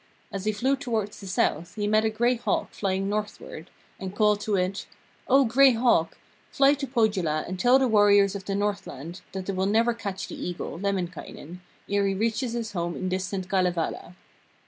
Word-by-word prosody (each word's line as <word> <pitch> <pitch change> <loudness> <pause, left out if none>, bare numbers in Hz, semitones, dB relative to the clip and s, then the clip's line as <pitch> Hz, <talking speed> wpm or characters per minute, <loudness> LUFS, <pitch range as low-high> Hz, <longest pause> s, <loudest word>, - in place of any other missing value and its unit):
As 195 0 -5
he 215 - +2
flew 255 +7 +1
towards 225 -7 -3
the 200 - -9
south 175 -1 -1
he 210 -1 -2
met 215 +1 +3
a 220 - +2
gray 240 +3 +2
hawk 240 - -1
flying 195 -1 -1
northward, 205 -5 -5 0.3
and 190 0 -6
called 210 -1 +3
to 210 -1 0
it: 185 +1 -1 0.4
'O 270 +1 +5
Gray 260 +3 +5
Hawk, 225 -9 +2 0.3
fly 275 0 +4
to 280 -1 -4
Pohjola 200 - +1
and 185 0 -5
tell 250 +4 +5
the 265 -1 +2
warriors 205 -3 +5
of 195 -1 -6
the 195 - -2
Northland 190 -6 -4
that 190 -1 -4
they 195 - -2
will 190 +1 0
never 230 +3 +3
catch 200 -4 -5
the - - -9
Eagle, 175 -1 -5
Lemminkainen, 180 -3 -4 0.3
ere 200 0 +1
he 195 - 0
reaches 230 +3 -1
his 230 -2 -3
home 170 -3 -3
in 185 - -3
distant 185 0 -3
Kalevala.' 180 -2 -1
200 Hz, 190 wpm, -26 LUFS, 185-225 Hz, 0.4 s, O